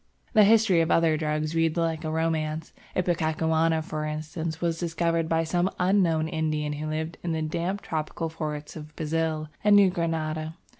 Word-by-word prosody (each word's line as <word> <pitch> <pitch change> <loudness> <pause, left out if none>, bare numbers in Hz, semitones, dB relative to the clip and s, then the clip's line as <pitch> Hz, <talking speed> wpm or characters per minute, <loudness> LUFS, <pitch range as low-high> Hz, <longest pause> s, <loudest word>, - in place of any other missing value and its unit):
The 215 -3 +7
history 210 -5 +5
of 165 - 0
other 165 -2 +4
drugs 155 0 -1
reads 165 0 +1
like 165 -1 0
a 155 - -2
romance. 160 0 -1 0.2
Ipecacuanha, 160 -2 +1
for 155 -1 -4
instance, 155 +1 -4
was 165 -1 -1
discovered 165 -1 0
by 165 0 +2
some 175 +3 +1
unknown 180 -4 +2
Indian 155 -2 -1
who 150 +1 -4
lived 160 +1 -3
in 170 -2 -2
the 160 - -1
damp 170 +5 -2
tropical 160 +1 -3
forests 150 -2 -5
of 155 -1 -10
Brazil 160 -1 -1
and 210 0 +6
New 200 -2 +6
Granada. 160 -2 -2
160 Hz, 165 wpm, -26 LUFS, 155-170 Hz, 0.2 s, The